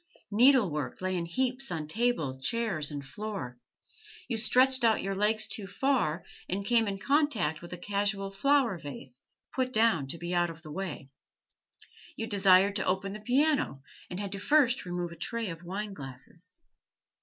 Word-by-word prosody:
Needlework 205 - +3
lay 185 0 -1
in 170 -1 -2
heaps 255 +8 0
on 165 -4 -3
table, 160 - 0
chairs, 175 - -1
and 145 -2 -6
floor; 145 - -6 0.7
you 235 - -1
stretched 255 +3 +4
out 225 -1 +3
your 195 +1 -1
legs 210 +2 +1
too 200 -3 -5
far, 200 - 0 0.2
and 195 +2 -2
came 230 0 +3
in 195 -1 -2
contact 230 - +2
with 175 - -10
a 180 - -5
casual 200 +1 -1
flower 240 -2 +2
vase, 135 -3 -2 0.3
put 255 -1 -1
down 220 - +3
to 150 - -4
be 170 +2 -4
out 175 -1 +2
of 165 0 -10
the 155 - -9
way; 150 -6 -5 1.0
you 225 - -3
desired 195 -2 +4
to - - -1
open 190 +1 0
the 210 - -7
piano, 255 - +1 0.3
and 180 - -5
had 200 -1 -4
first 255 -1 +4
to 180 - -8
remove 175 -1 -3
a - - -9
tray 225 +4 -3
of 165 0 -8
wineglasses. 180 - -8
195 Hz, 165 wpm, -29 LUFS, 170-230 Hz, 1.0 s, stretched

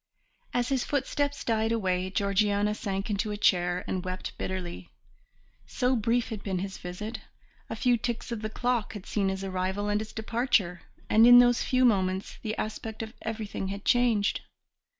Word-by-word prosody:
As 245 -1 0
his 265 -2 +1
footsteps 285 0 -1
died 225 -1 +1
away 185 -4 0
Georgiana 205 +1 +1
sank 195 0 -3
into 210 +1 -1
a 210 - -3
chair 180 -2 +2
and 185 -1 -2
wept 185 0 -5
bitterly. 180 -2 -5 0.8
So 255 0 +1
brief 230 +1 +1
had 215 -3 -5
been 190 -2 -2
his 190 +1 -4
visit 210 +6 -6 0.5
a - - -3
few 245 -2 +3
ticks 235 +1 -4
of 230 -2 -3
the 215 - -3
clock 240 -1 -1
had 205 -3 -8
seen 200 -2 0
his 190 0 -3
arrival 190 +2 -2
and 205 +1 +1
his 215 0 -7
departure; 220 -6 0 0.3
and 225 +2 +6
in 245 0 +10
those 245 -1 +6
few 255 0 +2
moments 190 -4 +1
the 215 -1 -3
aspect 220 +1 -4
of 220 +1 -8
everything 215 -3 -4
had 200 +1 -6
changed. 235 -5 +2
210 Hz, 170 wpm, -28 LUFS, 190-235 Hz, 0.8 s, in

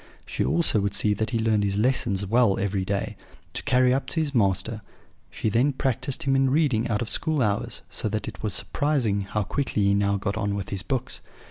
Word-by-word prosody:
She - - -2
also 170 -10 +2
would 100 0 -1
see 105 - +3
that 110 +3 -2
he 115 - -1
learned 110 -2 +1
his 100 0 -1
lessons 110 -4 +1
well 115 -1 +3
every 100 -1 -1
day, 100 +1 -2 0.4
to - - -4
carry 125 0 +3
up 135 - -1
to - - -1
his 150 -3 -1
master: 110 0 +1 0.5
she - - -3
then 120 +7 +2
practised 135 +3 -1
him 135 -2 +2
in 135 0 +3
reading 130 -6 +2
out 110 -1 0
of - - -6
school 155 -2 0
hours, 105 -5 -1
so 110 - -2
that 110 +1 -3
it - - -8
was 105 -4 -1
surprising 130 -9 0
how 105 +2 -2
quickly 115 -1 -1
he 100 0 +3
now 100 0 +1
got 100 +1 -3
on 100 -2 -1
with 100 -2 -5
his 100 -2 -2
books. 130 +4 -3
110 Hz, 220 wpm, -25 LUFS, 100-130 Hz, 0.5 s, see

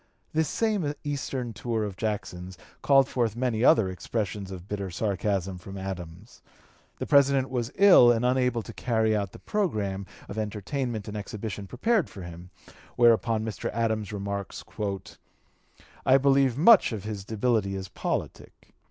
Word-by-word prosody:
This 160 -1 +1
same 205 -10 0
eastern 135 -4 -3
tour 110 +1 -2
of 100 -3 -4
Jackson's 95 -3 -4 0.2
called 135 -2 +5
forth 120 -5 -1
many 120 -2 -1
other 110 -5 +5
expressions 100 +2 -4
of 95 -1 -9
bitter 100 -2 -4
sarcasm 95 -1 -2
from 95 +2 -9
Adams. 95 +1 -8 0.6
The - - -4
President 140 -2 +4
was 120 -1 -2
ill 190 -12 +8
and 120 +1 +1
unable 125 -2 +1
to - - -10
carry 110 -2 +1
out 100 -3 -2
the - - -11
programme 105 - -2 0.2
of 105 - -5
entertainment 110 +2 -3
and 105 - -6
exhibition 105 -1 -5
prepared 205 - +1
for 95 - -10
him: 85 +1 -10 0.5
whereupon 115 -2 +3
Mr. 110 -3 -4
Adams 110 -2 -1
remarks: 100 -1 -5 1.4
"I 130 - +6
believe 135 -2 +3
much 195 - +6
of 105 -4 -5
his 105 -2 -5
debility 110 -2 0
is 95 -1 -5
politic.... - - -5
110 Hz, 145 wpm, -27 LUFS, 100-130 Hz, 1.4 s, ill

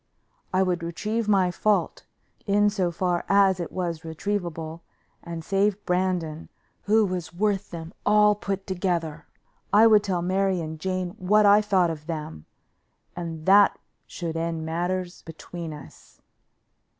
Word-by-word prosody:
I 190 +1 +3
would 180 -2 -1
retrieve 210 +7 -3
my 190 -3 +3
fault, 210 +4 0 0.4
in 205 +1 +3
so 190 -4 0
far 175 0 -1
as 195 -2 +4
it 170 - -4
was 175 -3 -3
retrievable, 165 -1 -4 0.4
and 170 -1 -7
save 200 +1 0
Brandon, 180 -3 -1 0.4
who 215 +1 +4
was 180 -3 -4
worth 205 +1 0
them 165 +1 -8
all 210 0 +5
put 195 -1 -4
together. 170 -5 -2 0.4
I 215 +2 +6
would 215 -2 +6
tell 180 -3 -1
Mary 190 0 +1
and 160 -1 -6
Jane 185 0 -2
what 210 +3 +4
I 205 +1 +7
thought 190 -5 +2
of 155 -1 -8
them, 150 - -6 0.7
and 165 -2 -6
that 200 +1 +6 0.3
should 165 -2 -5
end 165 -1 -2
matters 175 +2 -3
between 165 +1 -8
us. 150 -2 -13
180 Hz, 140 wpm, -25 LUFS, 165-200 Hz, 0.7 s, I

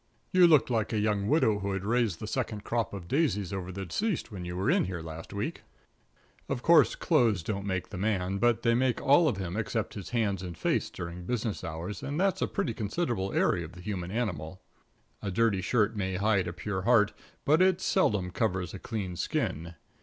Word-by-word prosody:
You 185 -2 +7
looked 150 -5 +4
like 110 -2 0
a 110 - 0
young 105 -1 +1
widow 125 -8 +3
who 100 0 -2
had 95 0 -3
raised 115 -5 +1
the - - -5
second 110 -2 -3
crop 115 -1 -1
of 95 -4 -7
daisies 105 - 0
over 95 -1 -4
the 95 +1 -5
deceased 195 - -2
when 95 -4 -6
you 90 0 -5
were 95 - -1
in - - +3
here 90 -3 -5
last 80 0 -8
week. - - -3 0.9
Of - - -2
course, - - +6
clothes 110 -8 +2
don't 100 +1 -3
make 95 -2 -2
the 90 - -6
man, 100 -2 0
but 120 +1 +2
they 115 -1 +4
make 125 +1 +2
all 145 +4 +5
of 120 -10 0
him 95 -2 -4
except 110 0 -2
his 100 -3 -7
hands 105 -6 0
and 90 -3 -7
face - - 0
during 85 +1 -7
business 115 -3 -2
hours, 80 +6 -5
and 145 +3 -3
that's 195 -1 +1
a - - +2
pretty 115 - -2
considerable 110 - -2
area 85 - +2
of 80 - -9
the 90 - -11
human 90 -3 -4
animal. 95 -6 -3 0.6
A 100 - -3
dirty 100 0 +2
shirt 110 +2 +1
may 95 -2 -2
hide 100 -1 +2
a 85 - -4
pure 95 +1 -3
heart, 105 -1 +4 0.3
but 155 +4 +4
it 185 -1 +4
seldom 105 - +1
covers 95 -4 -1
a 95 - -6
clean 100 -6 -4
skin. 85 0 -2
105 Hz, 210 wpm, -29 LUFS, 90-115 Hz, 0.9 s, You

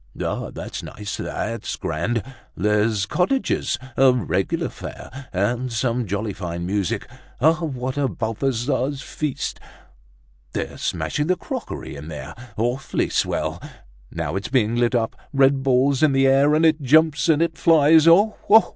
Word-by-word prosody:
"Ah! - - -3
that's - - -6
nice, 105 -1 -6
that's - - -4
grand! 105 +9 -2 0.3
There're 105 +3 +2 0.2
cottages, 190 - 0 0.2
a 135 -1 +6
regular 125 -5 -1
fair. 135 0 -9
And 120 +7 -1
some 120 0 -1
jolly 100 +2 -2
fine 85 -2 -5
music! 95 -1 -1 0.3
What 145 -4 0
a 140 - +2
Balthazar's 130 +4 -1
feast! 150 -4 -4 0.9
They're - - -4
smashing 150 +1 -1
the 185 - +3
crockery 180 - -6
in 70 +2 -9
there. 75 -4 -7 0.2
Awfully 120 +4 -1
swell! - - -1 0.5
Now 80 0 -4
it's 95 - -3
being 120 -4 +2
lit 120 +1 +2
up; 115 -2 0 0.2
red 135 0 +4
balls 135 +1 +2
in 155 -3 +4
the 135 0 +3
air, 140 +3 +4
and 160 +1 +3
it 160 -1 +3
jumps, 150 +1 +3
and 155 -2 +4
it 170 0 +1
flies! 160 0 +5
Oh! 200 +6 +5
oh! 220 +2 +7
130 Hz, 145 wpm, -22 LUFS, 110-150 Hz, 0.9 s, oh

